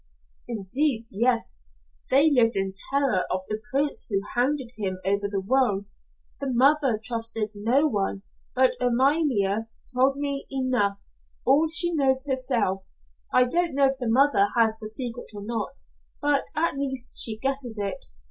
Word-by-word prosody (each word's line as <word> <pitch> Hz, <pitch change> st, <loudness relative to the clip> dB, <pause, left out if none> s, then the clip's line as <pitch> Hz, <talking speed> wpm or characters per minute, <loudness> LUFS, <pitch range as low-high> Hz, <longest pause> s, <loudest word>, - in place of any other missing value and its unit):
"Indeed, 235 Hz, +3 st, -1 dB
yes. 230 Hz, -, 0 dB, 0.4 s
They 285 Hz, +4 st, +4 dB
lived 240 Hz, -4 st, +3 dB
in 195 Hz, 0 st, -2 dB, 0.2 s
terror 275 Hz, -8 st, +1 dB
of 185 Hz, -, -1 dB
the 215 Hz, 0 st, -3 dB
prince 280 Hz, +2 st, +1 dB
who 200 Hz, -3 st, +1 dB
hounded 255 Hz, 0 st, 0 dB
him 190 Hz, -3 st, -3 dB
over 200 Hz, +1 st, 0 dB
the 200 Hz, -1 st, -2 dB
world. 210 Hz, -6 st, +1 dB, 0.5 s
The 275 Hz, -2 st, -3 dB
mother 265 Hz, -2 st, +3 dB
trusted 225 Hz, -2 st, -1 dB
no 235 Hz, +8 st, +1 dB
one, 200 Hz, -6 st, -2 dB, 0.3 s
but 260 Hz, 0 st, +4 dB
Amalia 245 Hz, -5 st, +1 dB, 0.2 s
told 265 Hz, +2 st, +2 dB
me 280 Hz, -1 st, -3 dB
enough 255 Hz, -7 st, 0 dB, 0.5 s
all 290 Hz, +5 st, +4 dB
she 345 Hz, +1 st, +5 dB
knows 265 Hz, -3 st, +2 dB
herself. 255 Hz, -8 st, 0 dB, 0.5 s
I 255 Hz, -, +4 dB
don't 335 Hz, +3 st, 0 dB
know 280 Hz, 0 st, +4 dB
if 270 Hz, 0 st, 0 dB
the 245 Hz, -3 st, -2 dB
mother 250 Hz, -4 st, +4 dB
has 225 Hz, -1 st, +4 dB
the 215 Hz, -, -7 dB
secret 240 Hz, +1 st, -5 dB
or 205 Hz, -, -7 dB
not, 225 Hz, -2 st, -4 dB, 0.4 s
but 290 Hz, -1 st, +1 dB
at 325 Hz, +2 st, +1 dB
least 265 Hz, -2 st, -3 dB
she 220 Hz, -2 st, +4 dB
guesses 265 Hz, -2 st, -2 dB
it. 200 Hz, -1 st, -3 dB
250 Hz, 150 wpm, -25 LUFS, 215-275 Hz, 0.5 s, she